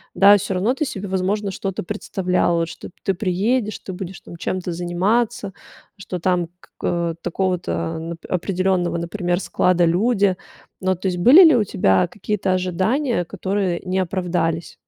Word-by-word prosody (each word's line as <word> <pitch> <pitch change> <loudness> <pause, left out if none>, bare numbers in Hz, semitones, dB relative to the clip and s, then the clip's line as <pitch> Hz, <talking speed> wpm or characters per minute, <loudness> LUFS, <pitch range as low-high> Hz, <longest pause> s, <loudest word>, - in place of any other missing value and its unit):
Да, 200 +1 +7
всё 195 0 -3
равно 190 +5 0
ты 305 - -2
себе, 205 -6 -5
возможно, 195 +2 -1
что-то 195 0 -4
представляла, 180 -3 0
вот 165 - -2
что - - -9 0.2
ты 195 - +3
приедешь, 210 +5 0
ты - - -3
будешь 185 0 -7
там - - -11
чем-то 180 0 -3
заниматься, 190 +5 0 0.5
что 185 -2 -6
там 175 0 +1 0.3
как 170 -1 -1
такого-то 180 0 -1 0.6
определённого, 180 -1 0
например, 175 +1 -1
склада 180 -2 +2
люди. 200 +1 +2 0.5
Ну, 185 0 +1
то 185 +2 -4
есть 180 -1 -1
были 275 - +9
ли 315 -5 +6
у 225 - +3
тебя 95 - +2
какие-то 195 +1 -2
ожидания, 185 - 0
которые 190 -1 -2
не 185 +1 0
оправдались? 170 -2 -2
185 Hz, 150 wpm, -21 LUFS, 175-200 Hz, 0.6 s, были